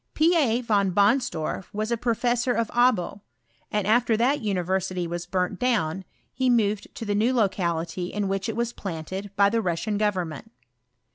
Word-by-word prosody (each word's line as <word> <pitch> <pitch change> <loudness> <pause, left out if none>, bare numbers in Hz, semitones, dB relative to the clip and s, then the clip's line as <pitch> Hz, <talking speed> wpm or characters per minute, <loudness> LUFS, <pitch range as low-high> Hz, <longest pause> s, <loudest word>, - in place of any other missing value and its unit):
" - - -51
P. 330 +3 +4
A. 250 -7 +2
Von 200 -5 +1
Bonsdorf 200 - +1
was 215 +2 -2
a - - +3
professor 240 +1 0
of 230 -2 -1
Abo, 235 -5 +2 0.5
and 210 -2 0
^fter 225 +1 +3
that 260 +6 +2
university 185 -2 -1
was 170 +1 -5
burnt 185 0 -1
down, 190 -8 0 0.3
he 260 0 +1
moved 215 -4 +1
to 230 - -6
tfae 205 -1 0
new 220 +5 +2
locality 175 -5 0
in 205 +1 -2
which 195 +1 -2
it 225 - -3
was 235 +1 -1
planted 190 +2 -5
by 200 0 +5
the 225 +3 +1
Russian 205 +3 -1
government. 190 -3 -2
205 Hz, 170 wpm, -25 LUFS, 185-235 Hz, 0.5 s, by